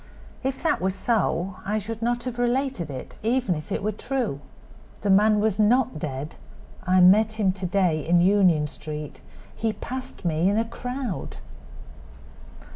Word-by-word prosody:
If 265 +3 -3
that 325 - +1
were 190 - +1
so 190 -2 -1
I 210 +2 -1
should 225 +1 -5
not 240 +1 0
have 245 -1 -5
related 245 - 0
it, 130 -2 -8
even 235 -3 +1
if 155 -2 -7
it - - -2
were 215 - +1
true. 225 - -3 0.6
The 200 - +1
man 210 +2 +5
was 215 -1 0
not 215 -5 +3
dead; 145 0 -5 0.5
I 185 0 +4
met 210 +4 +6
him 210 -4 +1
to 185 -1 -4
day 175 -5 +1
in 175 +1 +4
Union 180 -4 +4
street. 150 0 -7 0.3
He 220 -1 -1
passed 260 -4 -7
me 165 +2 +2
in 205 - +1
a 225 - +2
crowd." 245 -1 -5
205 Hz, 160 wpm, -25 LUFS, 175-235 Hz, 0.6 s, met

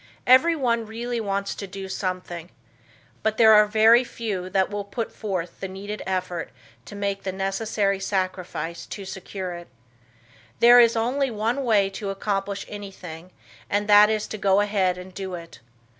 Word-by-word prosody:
Everyone 255 -4 +4
really 235 +2 -4
wants 200 -1 -2
to 200 - -7
do 195 0 -7
something, 180 -3 -4 0.7
but 220 0 0
there 220 -1 +7
are 215 +3 +6
few 205 -7 -4
that 190 0 +1
will 205 0 -3
put 220 +3 -5
forward 185 -5 -3
the 190 - -4
needed 200 +3 -7
effort 180 -3 -2 0.4
to 205 - -10
make 200 -1 -2
the 190 - -3
necessary 195 +1 -1
sacrifice 185 -4 -3
to 200 - -7
secure 190 -1 -6
it. 175 0 -9 0.9
There 240 +1 +8
is 235 -1 +5
only 260 +5 0
one 230 +4 -1
way 210 -5 +3
to 200 0 -5
accomplish 195 0 -2
anything 185 -4 -9 0.4
and 205 +1 0
that 210 0 +7
is 215 -1 0
to 215 - -6
go 195 0 +3
ahead 195 -3 +1
and 180 +1 -10
do 190 -1 -5
it. 165 -6 -11
200 Hz, 160 wpm, -24 LUFS, 190-220 Hz, 0.9 s, There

